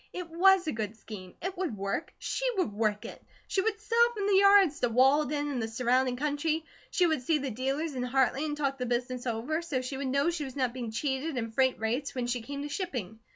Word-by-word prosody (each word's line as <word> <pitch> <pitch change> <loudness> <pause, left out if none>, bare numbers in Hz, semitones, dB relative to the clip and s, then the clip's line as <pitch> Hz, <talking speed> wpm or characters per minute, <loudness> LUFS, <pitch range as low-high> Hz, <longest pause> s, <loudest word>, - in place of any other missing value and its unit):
It 355 -2 -6
WAS 375 +2 +5
a 310 - 0
good 220 -1 -4
scheme. 195 -5 -10
It 375 +1 -3
would 335 - -2
work. 200 +9 -3
She - - -3
would 360 - 0
work 210 -1 0
it. - - -9 0.3
She 385 - +1
would 435 +1 -1
sell 465 +2 +4
from 405 -2 -2
the 405 - +2
yards 395 -6 +6
to 245 - +1
Walden 290 +4 +3
and 255 -4 -2
the 225 - -1
surrounding 250 +2 +1
country. 300 +3 -1 0.2
She 360 - +2
would 315 -5 +1
see 305 +5 +2
the 275 -2 -3
dealers 270 +7 -2
in 255 - -3
Hartley 265 +2 +1
and 295 -1 -2
talk 275 -2 -1
the 250 - -2
business 245 +1 -2
over, 245 +8 -1
so 280 -7 -2
she 265 +1 -4
would 275 0 -3
know 280 +5 +2
she 335 -3 -3
was 265 -3 -7
not 255 -3 0
being 245 -3 -4
cheated 265 +5 -2
in 230 -2 -3
freight 260 +2 +2
rates 240 +6 -2
when 250 -2 -1
she 245 0 -1
came 280 +4 -6
to - - -3
shipping. 250 - -4
270 Hz, 240 wpm, -29 LUFS, 245-320 Hz, 0.3 s, yards